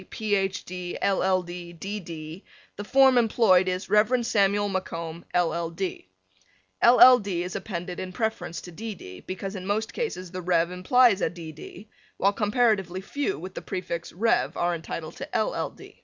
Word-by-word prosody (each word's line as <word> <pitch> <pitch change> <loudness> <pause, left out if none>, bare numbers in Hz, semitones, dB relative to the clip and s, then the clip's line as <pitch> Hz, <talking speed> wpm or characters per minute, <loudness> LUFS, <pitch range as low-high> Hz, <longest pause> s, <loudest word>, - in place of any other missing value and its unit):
B. - - -12
Sc., - - -28
Ph. 200 -3 -1
D., 180 -1 -5
LL. 190 -1 +2
D., 175 0 -8
D. 195 +5 -5
D. 165 0 -8 0.3
the 205 - -6
form 265 +2 +5
employed 215 -5 +4
is 185 +1 -2
Rev. 215 +4 +3
Samuel 205 -1 +2
MacComb, 170 -4 -4
LL. 170 -1 +1
D. 180 - -5 0.8
LL. 250 +1 +9
D. 190 -4 -2
is 180 +1 -6
appended 180 -2 -5
in 185 0 -5
preference 220 -4 -3
to 175 - -10
D. 215 +5 -6
D. 90 - -11
because 195 +2 -6
in 185 -1 -6
most 215 +2 -1
cases 185 - -4
the 185 0 -5
"Rev." 170 -1 +1
implies 205 +3 +4
a - - +2
"D. 170 -3 -9
D." 175 +6 -11 0.3
while 200 +1 +3
comparatively 205 -4 +1
few 285 +9 -2
with 185 +4 -8
the - - -6
prefix 170 -3 -5
"Rev." 225 +6 +1
are 175 0 +1
entitled 165 -1 -6
to 275 - -7
"LL. - - -2
185 Hz, 175 wpm, -26 LUFS, 175-210 Hz, 0.8 s, LL